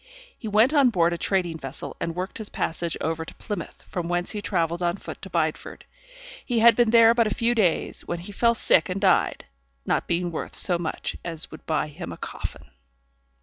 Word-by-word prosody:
He 220 - -8
went 215 +7 +4
on 280 -4 +5
board 175 -5 +2
a - - -2
trading 175 -4 0
vessel, 135 -2 -6
and 165 - -3
worked 185 +4 -4
his 215 - -4
passage 170 0 -2
over 160 0 -2
to - - -11
Plymouth, 205 - -6
from 175 -2 -4
whence 175 0 -1
he 210 -2 -4
travelled 170 -3 -1
on 175 +2 0
foot - - -9
to 195 - -7
Bideford. 160 -3 -2 0.6
He 245 - -1
had 230 0 +7
been 240 -1 +3
there 230 0 +7
but 235 -2 +3
a 210 - -2
few 235 +1 +2
days, 195 -8 +1
when 175 - -2
he 175 +4 -8
fell 235 +3 +2
sick 215 - +4
and 185 +2 -2
died; 190 -2 +2 0.4
not - - 0
being 175 0 0
worth 160 - -5
so 175 -2 +1
much 165 -2 -3
as 165 -2 -4
would 155 - -12
buy 160 - +1
him 155 +4 -8
a - - -8
coffin! - - -7
180 Hz, 210 wpm, -25 LUFS, 170-220 Hz, 0.6 s, had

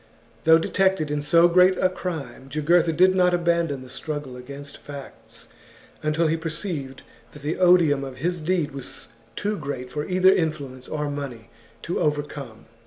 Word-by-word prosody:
Though 160 0 +8
detected 190 -2 +1
in 150 0 -1
so 165 +4 +5
great 180 +2 +5
a - - +3
crime, 160 -8 -6
Jugurtha 165 +3 +3
did 185 +4 +4
not 180 -1 +3
abandon 170 -5 0
the - - -12
struggle 145 -1 -5
against 140 +3 -9
facts 140 -2 -11 0.5
until 155 +2 +1
he 160 +1 +1
perceived 160 -4 -4 0.3
that 150 - -13
the 150 +5 -2
odium 175 -6 +5
of 135 -2 -7
his 175 +5 -1
deed 165 -2 0
was 135 -2 -8 0.3
too 210 +1 -1
great 130 -4 -5
for 150 - -3
either 185 +1 +4
influence 140 -6 -3
or 150 -1 -3
money 135 -6 -6 0.3
to 170 - -2
overcome. 145 -6 -3
155 Hz, 160 wpm, -24 LUFS, 140-175 Hz, 0.5 s, Though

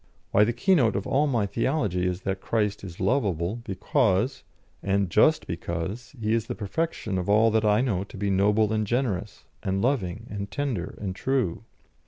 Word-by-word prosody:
"Why, 105 - +5
the 120 - +1
keynote 120 - +3
of 100 - -2
all 145 +3 +2
my 120 -7 +1
theology 100 - 0
is 90 +1 -2
that 95 0 -3
Christ 105 -3 -1
is 90 -4 -9
lovable 100 - 0
because, 110 +3 +1 0.4
and 100 -2 0
just 155 - +4
because, 85 - -5
He 110 0 0
is 115 -1 0
the - - -3
perfection 110 - -2
of 90 - -3
all 110 +2 +5
that 110 0 +2
I 105 +2 +4
know 105 -8 0
to 100 - -12
be 100 0 -1
noble 105 +3 +3
and 110 -1 0
generous, 120 -5 -2 0.2
and 95 0 -1
loving, 110 -4 -1
and 100 -1 -4
tender, 125 -12 -3
and 95 -3 -4
true. 115 -6 -1
105 Hz, 180 wpm, -26 LUFS, 95-120 Hz, 0.4 s, Why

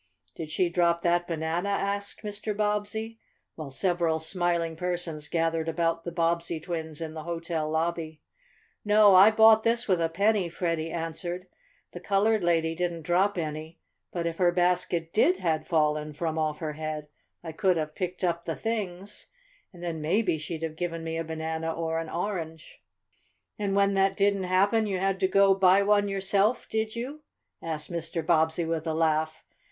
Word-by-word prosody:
"Did 160 -2 -7
she 175 +3 +1
drop 170 -1 +2
that 175 0 +1
banana?" 165 +3 -2
asked 200 +1 -2
Mr. 210 0 -4
Bobbsey, 210 +2 -2 0.3
while 155 -3 -7
several 170 +2 0
smiling 170 0 -1
persons 170 -3 -3
gathered 165 0 0
about 165 0 -1
the 170 - -3
Bobbsey 170 -1 0
twins 160 -2 -5
in 160 -1 -5
the 160 - -6
hotel 165 -1 -3
lobby. 160 -1 -2 0.6
"No, 210 -1 +6
I 190 +3 +9
bought 220 0 +6
this 235 +2 +1
with 185 -4 +2
a 165 - +1
penny," 200 +1 +1
Freddie 165 -2 -2
answered. 170 +2 -4 0.5
"The 175 - -8
colored 200 +3 +2
lady 165 -1 +2
didn't 170 -1 -3
drop 185 +5 +2
any. 155 0 -5 0.3
But 170 -2 -3
if 165 -1 -2
her 175 -1 +4
basket 175 -2 0
did 185 -3 +4
had 160 -4 -1
fallen 150 -2 +1
from 160 +1 -2
off 155 -1 -1
her 155 -2 -4
head 155 -1 -5 0.4
I 165 - -5
could 185 +1 +1
have 155 -1 -3
picked 180 +2 -4
up 170 -1 0
the 165 - -2
things, 205 -3 -4 0.4
and 175 -2 -12
then 165 -2 -3
maybe 175 +1 +1
she'd 160 +1 -5
have 160 -1 -4
given 165 -1 -3
me 165 0 -3
a 165 - -1
banana 160 0 -3
or 165 0 -2
an 165 -1 -5
orange." 165 -3 -5 0.8
"And 200 -2 -1
when 200 0 +3
that 195 0 +2
didn't 200 -1 +2
happen 200 +4 +2
you 195 -2 -1
had 195 0 0
to 190 - +3
go 195 +1 +5
buy 190 +1 +5
one 205 0 +3
yourself; 195 +3 +1
did 220 0 -2
you?" 265 +6 -5 0.4
asked 160 0 -5
Mr. 165 -1 -3
Bobbsey 160 0 +2
with 165 0 -2
a 160 - -1
laugh. 155 -1 0
170 Hz, 175 wpm, -27 LUFS, 160-195 Hz, 0.8 s, I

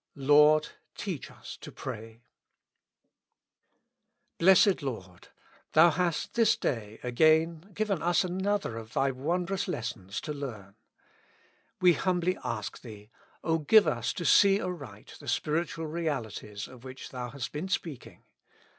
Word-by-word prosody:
"Lord, 150 +2 +5 0.3
teach - - -5
us - - -10
to - - -10
pray." 115 +2 -8 2.2
Blessed 190 +1 +5
Lord! 95 -10 -7 0.5
Thou 165 +2 +7
hast 170 0 -1
this 230 -2 +4
day 110 -3 -3
again 160 +7 +2
given 205 -5 -1
us 175 +1 +2
another 190 - -1
of 110 0 -9
Thy 135 0 +2
wondrous 175 +8 -2
lessons 110 - -4
to 150 - -4
learn. 110 -9 -7 1.1
We 180 -1 +6
humbly 180 0 0
ask 110 -3 -4
Thee, 105 -2 -12 0.3
O 165 0 +1
give 205 +8 +6
us 120 0 0
to 175 - -5
see 200 0 +6
aright 140 - -7
the 145 - -13
spiritual 160 +5 -1
realities 130 -10 -4
of 125 -2 -14
which 130 0 -9
Thou 125 -1 -5
hast 135 0 -6
been 150 +6 -4
speaking. 165 -7 -5
150 Hz, 130 wpm, -29 LUFS, 120-175 Hz, 2.2 s, Thou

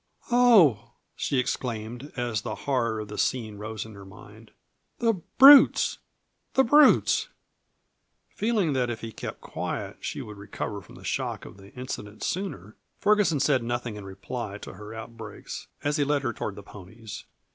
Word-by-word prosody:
"Oh!" 170 - +5 0.2
she 140 - -1
exclaimed, 120 +1 -3
as 120 -4 -1
the 110 -1 -4
horror 115 -5 0
of 105 - -7
the 105 - -7
scene 110 -5 -1
rose 110 0 -5
in 110 - -11
her 100 -1 -11
mind. 95 -1 -14 0.5
"The 230 -1 +2 0.2
brutes! 275 +2 +8 0.6
The 265 - +6
brutes!" 290 +4 +5 1.0
Feeling 210 -8 0
that 125 -2 0
if 115 -2 -4
he 115 - -6
kept - - -7
quiet - - -5
she - - -5
would 105 -1 -10
recover 100 0 -5
from - - -16
the - - -14
shock - - -3
of - - -12
the 100 +1 -15
incident 110 -4 -7
sooner, 140 - -4 0.2
Ferguson 205 -8 +3
said 135 -2 +3
nothing 120 -1 -3
in 105 - -8
reply 100 +2 -6
to - - -8
her 105 +1 -10
outbreaks 110 -1 -8 0.2
as 145 +2 0
he 145 - +2
led 145 0 0
her 120 -2 -1
toward 100 - -4
the 100 - -10
ponies. 105 +3 -10
120 Hz, 165 wpm, -26 LUFS, 105-145 Hz, 1.0 s, brutes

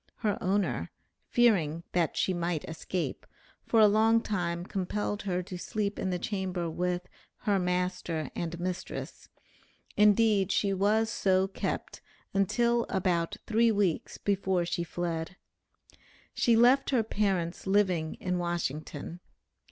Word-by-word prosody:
Her 210 -3 -1
owner, 195 +2 0 0.4
fearing 170 -10 +2
that 170 -3 0
she 190 - +1
might 170 -2 -2
escape, 165 +2 -4 0.4
for 230 - +3
a 215 - +8
long 220 +2 +4
time 175 -6 -2
compelled 200 +2 -2
her 185 -2 -2
to 180 0 -7
sleep 210 0 -2
in 190 - -1
the 180 - 0
chamber 185 -2 -2
with 180 +1 -2 0.3
"her 205 -4 +2
master 180 -4 -1
and 170 0 -4
mistress;" 180 0 -5 0.7
indeed 210 -2 +4
she 200 0 +1
was 215 +4 +2
so 190 -3 +2
kept 195 - -4 0.3
until 235 +4 +2
about 180 -3 0
three 230 +1 +3
weeks 200 -6 0
before 190 -3 0
she 170 0 -2
fled. 170 0 -3 1.0
She 235 - +3
left 250 +4 +5
her 250 -5 +2
parents 195 -5 -1
living 185 -5 +2
in 180 -1 -2
Washington. 170 -1 -3
185 Hz, 130 wpm, -29 LUFS, 175-210 Hz, 1.0 s, a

